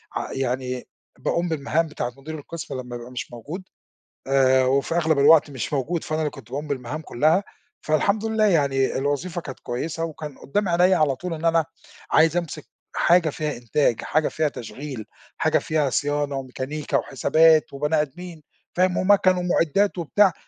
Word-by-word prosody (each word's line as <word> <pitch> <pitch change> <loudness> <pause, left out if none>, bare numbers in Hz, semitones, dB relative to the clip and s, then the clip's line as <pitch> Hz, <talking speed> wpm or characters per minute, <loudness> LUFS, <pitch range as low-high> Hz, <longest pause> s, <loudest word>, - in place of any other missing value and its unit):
ع - - -3
يعني 130 -1 -2 0.3
باقوم 175 +1 0
بالمهام 160 +2 0
بتاعة 125 -5 -4
مدير 155 +3 -7
القِسم 145 -3 -7
لمّا 120 -1 -8
يبقى 120 +1 -8
مش 125 - -6
موجود، 150 - -7 0.6
آآ 130 -1 +4
وفي 140 +5 +1
أغلب 160 -4 +2
الوقت 150 +1 +6
مش 135 +2 -4
موجود 150 +5 -1
فأنا 155 -1 -2
اللي 150 - -1
كنت 125 -5 -13
باقوم 145 +3 -4
بالمَهام 140 +2 -4
كُلّها، 155 +8 +2 0.4
فالحمد 200 +8 +1
لله 220 -1 +2
يعني 140 -8 +2
الوظيفة 145 +6 -2
كانت 135 -4 -8
كويّسة 160 +7 -4
وكان 155 -3 -6
قدّام 200 +6 -1
عينيا 180 +2 +4
على 145 -4 +2
طول 180 +4 -5
إن 165 +1 -5
أنا 165 -1 +3 0.5
عايز 160 +2 +4
أمسِك 160 -3 -4 0.3
حاجة 170 -2 +4
فيها 150 -2 -3
إنتاج 120 0 +1
حاجة 155 +1 +1
فيها 155 -1 0
تشغيل 130 -1 -7 0.3
حاجة - - +2
فيها 150 -3 0
صيانة، 145 0 -1
وميكانيكا، 135 +3 -3
وحسابات، 155 +4 +3
وبني 150 +2 +1
آدمين. 160 +2 -8 0.3
فاهم؟ 180 0 +2
ومَكن، 185 -1 +4
ومُعدّات، 180 +2 +1
وبتاع 180 +3 +3
150 Hz, 160 wpm, -23 LUFS, 135-170 Hz, 0.6 s, الوقت